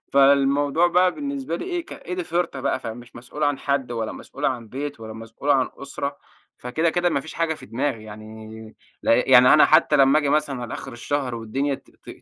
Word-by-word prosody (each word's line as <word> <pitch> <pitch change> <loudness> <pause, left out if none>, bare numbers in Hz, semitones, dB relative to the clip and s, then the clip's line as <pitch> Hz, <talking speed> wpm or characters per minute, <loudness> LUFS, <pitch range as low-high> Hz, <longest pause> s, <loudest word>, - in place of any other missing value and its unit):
فالموضوع 140 +3 +4
بقى 180 +1 +3
بالنسبة 280 - -4
لي - - -6
إيه 350 -1 -3
ك - - -10
إيدي 365 -1 -5
فِرطة 170 - -2
بقى، 130 -1 -1
فمش 120 +1 -9
مسؤول 125 +5 -8
عن 145 -2 +1
حد 140 -3 -1
ولا 115 -2 -3
مسؤول 140 - -9
عن 120 -6 -1
بيت 140 0 -6
ولا 110 0 -8
مسؤول 115 +5 -5
عن 135 -2 +3
أسرة، 140 0 -5 0.4
فكده 160 +7 0
كده 175 +1 +1
ما 140 - 0
فيش 160 - -10
حاجة 165 -1 0
في - - -13
دماغي 115 0 -2
يعني، 110 +1 -10 0.3
ل - - -5
يعني 125 +2 +6
أنا 155 - +7
حتى 155 -1 +4
لمّا 135 +2 +5
آجي 145 -2 0
مثلًا 145 -1 +1
أنا 125 - -6
على 120 - -5
آخر 135 - -8
الشهر 125 +1 -3
والدنيا 135 +5 -2
ت - - -14
ت - - -18
140 Hz, 210 wpm, -23 LUFS, 120-155 Hz, 0.4 s, أنا